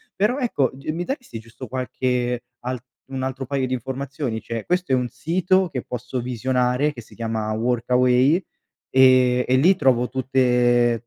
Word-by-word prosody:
Però 215 Hz, +7 st, +1 dB
ecco, 185 Hz, -, +1 dB
g 135 Hz, +3 st, -9 dB
mi 170 Hz, +3 st, -3 dB
daresti 250 Hz, -, -5 dB
giusto 115 Hz, +3 st, -11 dB
qualche 125 Hz, -1 st, -2 dB, 0.2 s
altr 125 Hz, 0 st, -4 dB, 0.3 s
un 135 Hz, -1 st, -3 dB
altro 130 Hz, 0 st, -3 dB
paio 135 Hz, 0 st, -1 dB
di 130 Hz, -, -3 dB
informazioni: 130 Hz, -1 st, -4 dB
cioè, 115 Hz, 0 st, -5 dB
questo 180 Hz, -4 st, -1 dB
è -, -, +5 dB
un 125 Hz, -1 st, -1 dB
sito 175 Hz, +8 st, +1 dB
che 125 Hz, -6 st, -4 dB
posso 125 Hz, +1 st, -4 dB
visionare 125 Hz, +3 st, 0 dB
che 125 Hz, -5 st, -10 dB
si 110 Hz, -, -18 dB
chiama 110 Hz, -2 st, -3 dB
Workaway 125 Hz, -, +2 dB, 0.5 s
e 130 Hz, -1 st, +5 dB
e 130 Hz, -, +4 dB
lì 175 Hz, +9 st, +5 dB
trovo 125 Hz, -7 st, +2 dB
tutte 125 Hz, -2 st, +2 dB
130 Hz, 165 wpm, -22 LUFS, 120-135 Hz, 0.5 s, è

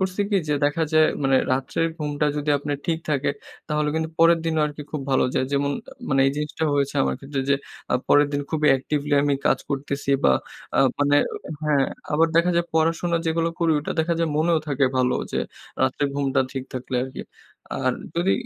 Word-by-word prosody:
করছি 190 Hz, +1 st, -1 dB
কি 200 Hz, -, +3 dB
যে, 150 Hz, -, +2 dB
দেখা 150 Hz, +3 st, +1 dB
যায় 155 Hz, 0 st, +6 dB, 0.2 s
মানে 135 Hz, 0 st, +4 dB, 0.2 s
রাত্রের 135 Hz, +5 st, 0 dB
ঘুমটা 150 Hz, 0 st, -1 dB
যদি 150 Hz, 0 st, -1 dB
আপনার 145 Hz, 0 st, -3 dB
ঠিক 165 Hz, -1 st, +1 dB
থাকে 140 Hz, -1 st, +1 dB, 0.4 s
তাহলে 150 Hz, -1 st, 0 dB
কিন্তু 160 Hz, 0 st, -1 dB
পরের 165 Hz, 0 st, +6 dB
দিনও 160 Hz, -1 st, +1 dB
আরকি 150 Hz, 0 st, -7 dB
খুব 150 Hz, -3 st, -3 dB
ভালো 130 Hz, -, +3 dB
যায়। 130 Hz, -, +2 dB
যেমন 140 Hz, 0 st, +1 dB, 0.2 s
আ -, -, -11 dB, 0.2 s
মানে 135 Hz, 0 st, +2 dB
এই 135 Hz, -, +3 dB
জিনিসটা 150 Hz, +2 st, -2 dB
হয়েছে 140 Hz, -1 st, 0 dB
আমার 65 Hz, 0 st, 0 dB
ক্ষেত্রে 140 Hz, 0 st, -4 dB
যে, -, -, +6 dB, 0.4 s
আ -, -, +4 dB
পরের 145 Hz, 0 st, +6 dB
দিন 145 Hz, -, 0 dB
খুবই 155 Hz, -2 st, +2 dB
actively 145 Hz, +2 st, -1 dB
আমি 145 Hz, -1 st, +2 dB
কাজ -, -, +3 dB
করতেছি 140 Hz, 0 st, -2 dB
বা 65 Hz, -, +6 dB, 0.4 s
আ -, -, +2 dB, 0.2 s
মানে 145 Hz, 0 st, +4 dB, 0.5 s
হ্যাঁ, 150 Hz, -2 st, +3 dB, 0.3 s
আবার 160 Hz, +2 st, +4 dB
দেখা 170 Hz, +2 st, +4 dB
যায় 170 Hz, -, +2 dB
পড়াশোনা 165 Hz, +1 st, +2 dB
যেগুলো 165 Hz, +1 st, +1 dB
করি 165 Hz, -2 st, +2 dB
ওটা 145 Hz, -, -3 dB
দেখা 170 Hz, +1 st, 0 dB
যায় 165 Hz, -1 st, +1 dB
মনেও 165 Hz, +1 st, +3 dB
থাকে 140 Hz, -1 st, +2 dB
ভালো 125 Hz, 0 st, +2 dB, 0.2 s
যে, -, -, 0 dB, 0.4 s
রাত্রে 130 Hz, +2 st, +1 dB
ঘুমটা 140 Hz, -2 st, +1 dB
ঠিক 135 Hz, -1 st, -4 dB
থাকলে 130 Hz, 0 st, -5 dB
আরকি। 130 Hz, 0 st, -6 dB, 0.6 s
আর 130 Hz, -1 st, +2 dB, 0.2 s
যদি 175 Hz, +3 st, +2 dB
150 Hz, 200 wpm, -23 LUFS, 140-160 Hz, 0.6 s, যায়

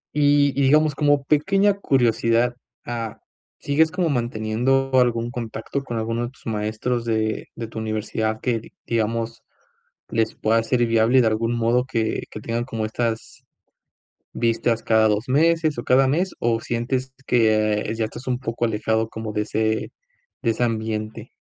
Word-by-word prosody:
Y 145 Hz, -1 st, +4 dB
y -, -, +3 dB
digamos, 150 Hz, +2 st, +4 dB
como 145 Hz, -1 st, +2 dB
pequeña 195 Hz, +8 st, +3 dB
curiosidad, 120 Hz, -, +2 dB, 0.3 s
ah, 115 Hz, -2 st, -5 dB, 0.4 s
¿sigues 155 Hz, +3 st, +2 dB
como 180 Hz, -3 st, 0 dB
manteniendo 120 Hz, +2 st, 0 dB
algún 120 Hz, -1 st, 0 dB
contacto 120 Hz, +3 st, -4 dB
con 120 Hz, -3 st, -4 dB
alguno 115 Hz, +2 st, -1 dB
de 120 Hz, -, -5 dB
tus 135 Hz, -, -23 dB
maestros 110 Hz, +2 st, -2 dB
de 110 Hz, -1 st, -1 dB
de 115 Hz, -, -5 dB
tu 110 Hz, -, -7 dB
universidad 110 Hz, 0 st, -2 dB
que 115 Hz, -3 st, -1 dB, 0.2 s
digamos 115 Hz, 0 st, -1 dB, 0.7 s
les 110 Hz, -1 st, 0 dB
pueda 115 Hz, +1 st, +2 dB
ser 120 Hz, +1 st, +1 dB
viable 115 Hz, +3 st, +4 dB
de 115 Hz, -, +3 dB
algún 115 Hz, +2 st, 0 dB
modo 120 Hz, +2 st, +2 dB
que 115 Hz, -4 st, -1 dB
que 105 Hz, -, -7 dB
tengan 115 Hz, +1 st, -2 dB
como 115 Hz, -3 st, -3 dB
estas 115 Hz, 0 st, -3 dB, 0.9 s
vistas 115 Hz, 0 st, 0 dB
cada 110 Hz, -1 st, +4 dB
2 105 Hz, +5 st, -1 dB
meses, 160 Hz, +1 st, +2 dB
o 120 Hz, -, -3 dB
cada 130 Hz, +1 st, +4 dB
mes? 180 Hz, +6 st, 0 dB
O, 115 Hz, -1 st, +1 dB
¿sientes 130 Hz, +2 st, -2 dB
que 110 Hz, -2 st, +2 dB
ya 110 Hz, -, -1 dB
estás 120 Hz, +4 st, -9 dB
un 125 Hz, -1 st, 0 dB
poco 120 Hz, -2 st, -2 dB
alejado 110 Hz, 0 st, 0 dB
como 110 Hz, -1 st, -5 dB
de 105 Hz, -, 0 dB
ese 110 Hz, +1 st, -1 dB, 0.5 s
de 115 Hz, -, +2 dB
ese 115 Hz, -, -1 dB
ambiente? 110 Hz, -1 st, -3 dB
115 Hz, 155 wpm, -23 LUFS, 110-130 Hz, 0.9 s, Y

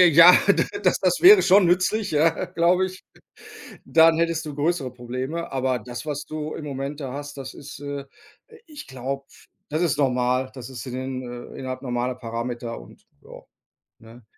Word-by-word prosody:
Ja, 170 Hz, +2 st, +10 dB, 0.4 s
das -, -, +2 dB
das -, -, +1 dB
wäre 385 Hz, +2 st, +9 dB
schon 190 Hz, +1 st, +5 dB
nützlich, 185 Hz, +4 st, +1 dB
ja, 160 Hz, +2 st, +2 dB
glaube 180 Hz, +3 st, +2 dB
ich. 185 Hz, 0 st, -9 dB, 0.8 s
Dann 160 Hz, 0 st, +5 dB
hättest 165 Hz, -1 st, 0 dB
du 150 Hz, -, -6 dB
größere 145 Hz, -2 st, -1 dB
Probleme, 130 Hz, +7 st, -5 dB
aber 130 Hz, -1 st, -1 dB
das, 120 Hz, +4 st, -8 dB
was 145 Hz, -1 st, -4 dB
du 155 Hz, 0 st, -5 dB
im 155 Hz, -, -7 dB
Moment 140 Hz, +1 st, -5 dB
da 135 Hz, -3 st, -5 dB
hast, 145 Hz, 0 st, -7 dB
das 135 Hz, -1 st, -7 dB
ist 140 Hz, -, -11 dB
äh, 145 Hz, 0 st, -5 dB, 0.5 s
äh, 455 Hz, -, -16 dB
ich 300 Hz, -2 st, -11 dB
glaube, 135 Hz, +1 st, -5 dB, 0.4 s
das 155 Hz, +2 st, -1 dB
ist 170 Hz, -4 st, +1 dB
normal 125 Hz, -1 st, +1 dB
das 130 Hz, -2 st, -9 dB
ist 125 Hz, -3 st, -8 dB
in 125 Hz, -, -6 dB
den 130 Hz, 0 st, -4 dB, 0.3 s
äh, -, -, -11 dB
innerhalb 130 Hz, -1 st, -5 dB
normaler 125 Hz, 0 st, -2 dB
Parameter 120 Hz, 0 st, -5 dB
und -, -, -17 dB, 0.2 s
ja, -, -, -12 dB, 0.6 s
ne? 115 Hz, +2 st, -16 dB
140 Hz, 175 wpm, -23 LUFS, 130-165 Hz, 0.8 s, Ja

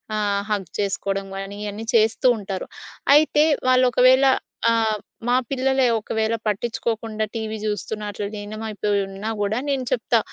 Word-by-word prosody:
ఆహ్, 205 Hz, -1 st, 0 dB
హగ్ 205 Hz, -2 st, -1 dB
చేసుకోవడం 195 Hz, 0 st, -1 dB
గానీ 195 Hz, +1 st, -6 dB
ఇయన్నీ 210 Hz, +2 st, -5 dB
చేస్తూ 225 Hz, +2 st, +3 dB
ఉంటారు. 195 Hz, -2 st, -5 dB, 0.5 s
అయితే 300 Hz, 0 st, +5 dB, 0.2 s
వాళ్ళు 255 Hz, 0 st, +5 dB
ఒకవేళ 260 Hz, +2 st, +5 dB, 0.5 s
ఆహ్, 220 Hz, -2 st, +2 dB, 0.3 s
మా 245 Hz, -, +3 dB
పిల్లలే 265 Hz, -1 st, +2 dB
ఒకవేళ 220 Hz, +1 st, -1 dB
పట్టించుకొకుండా 220 Hz, 0 st, -2 dB
టీవీ 220 Hz, -1 st, -3 dB
చూస్తున్నా, 210 Hz, +1 st, -3 dB
అట్ల 205 Hz, 0 st, -4 dB
లీనమైపోయి 210 Hz, -1 st, -2 dB
ఉన్నా 195 Hz, +3 st, -5 dB
గూడా 205 Hz, +3 st, 0 dB
నేను 270 Hz, -2 st, 0 dB
చెప్తా. 235 Hz, -1 st, +2 dB
215 Hz, 135 wpm, -22 LUFS, 205-235 Hz, 0.5 s, అయితే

